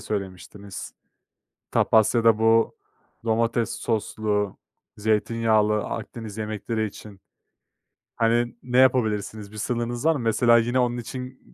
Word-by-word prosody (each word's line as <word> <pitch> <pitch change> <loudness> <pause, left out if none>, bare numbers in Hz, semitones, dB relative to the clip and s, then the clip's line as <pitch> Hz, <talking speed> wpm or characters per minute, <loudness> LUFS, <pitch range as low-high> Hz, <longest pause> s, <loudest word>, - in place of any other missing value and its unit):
söylemiştiniz. 100 0 -6 0.8
Tapas 110 +1 +3
ya 115 - +2
da, 115 -2 +5
bu 115 0 +3 0.5
domates 115 +1 +1
soslu, 105 -2 -2 0.4
zeytinyağlı 110 0 +1
Akdeniz 110 -2 -6
yemekleri 110 +1 -2
için, 100 -1 -11 1.0
hani, 120 +1 +1
ne 125 0 0
yapabilirsiniz? 110 -5 +2
Bir - - -11
sınırınız 120 +3 -2
var 165 - +6
mı? - - -3
Mesela, 115 +1 +4
yine, 120 +2 +1
onun 120 -1 +1
için 125 +2 -7
115 Hz, 115 wpm, -24 LUFS, 105-120 Hz, 1.0 s, var